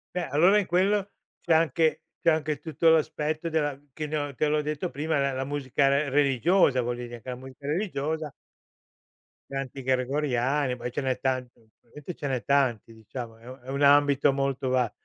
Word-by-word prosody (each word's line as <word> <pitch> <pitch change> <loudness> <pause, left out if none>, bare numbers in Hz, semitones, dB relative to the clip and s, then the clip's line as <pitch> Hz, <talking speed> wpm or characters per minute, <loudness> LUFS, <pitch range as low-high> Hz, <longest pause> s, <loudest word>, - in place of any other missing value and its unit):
Beh, 180 - -1
allora 180 +8 +5
in 200 - -2
quello 195 +3 +2 0.3
c'è 165 - +2
anche 160 0 +2 0.2
c'è 170 - +4
anche 155 -2 -1
tutto 160 +1 +1
l'aspetto 155 0 +1
della 145 -3 -1
che 155 - -4
ne 155 +1 -4
ho 145 -2 -4
te 155 - +1
l'ho 150 0 +1
detto 150 +4 -3
prima, 150 +1 -1
la 140 0 +1
la 130 0 -2
musica 140 0 0
re 140 +1 +2
religiosa, 140 +1 +3
voglio 120 +1 -3
dire, 120 0 -9
che 130 - -9
la 125 - -3
musica 130 +1 -12
religiosa 155 -3 -2 1.2
Canti 135 0 -5
gregoriani, 130 0 0
poi 120 0 -5
ce 140 - -3
n'è 130 -1 -1
tanti, 130 -1 -1
probabilmente 120 +8 -11
ce 145 - -4
n'è 130 -3 -2
tanti, 130 -5 +1
diciamo, 115 +1 -8
è 115 +2 -17
u 130 +1 -9
è 125 - -20
un 140 +1 -2
ambito 145 -1 +5
molto 135 -1 -1
ba 125 -4 +1
140 Hz, 185 wpm, -27 LUFS, 130-155 Hz, 1.2 s, allora